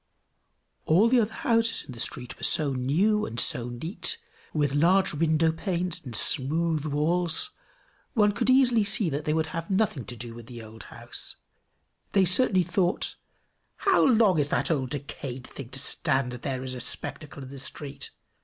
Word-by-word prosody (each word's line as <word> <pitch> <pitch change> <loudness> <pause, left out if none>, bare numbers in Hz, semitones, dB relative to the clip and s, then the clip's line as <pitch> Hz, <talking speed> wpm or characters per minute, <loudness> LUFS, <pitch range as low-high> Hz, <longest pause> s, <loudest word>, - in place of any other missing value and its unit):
All 185 +8 +5
the 250 0 +4
other 220 -1 0
houses 230 -2 +1
in - - -10
the 120 - -10
street 125 +1 -3
were - - -18
so 145 -3 +3
new 175 +12 +1
and 115 +1 -5
so 120 0 +3
neat, 160 - -3 0.3
with 145 -3 0
large 175 +7 +3
window 160 +1 +2
panes 175 0 -3
and 125 -5 -6
smooth 155 +5 +2
walls, 165 - 0 0.6
one 210 -2 +4
could 205 - -1
easily 250 -4 +5
see 200 -3 +1
that 145 +2 -3
they 155 - +1
would 160 0 +1
have 165 0 -4
nothing 190 - 0
to 120 - -8
do 120 0 -8
with 115 -1 -11
the 120 -2 -9
old 110 0 -12
house: - - -6 0.8
they 195 -2 +4
certainly 185 0 +4
thought, 180 +1 0 0.6
"How 390 -2 +3
long 220 - +4
is 145 0 +1
that - - 0
old 135 -5 -1
decayed 135 -3 -6
thing 135 -4 -9
to 135 - -2
stand 135 -2 +1
here 130 -2 -3
as 130 -1 -3
a 125 - -4
spectacle 145 +4 -5
in 130 - -10
the 135 0 -8
street? 140 0 -6
155 Hz, 175 wpm, -27 LUFS, 130-195 Hz, 0.8 s, All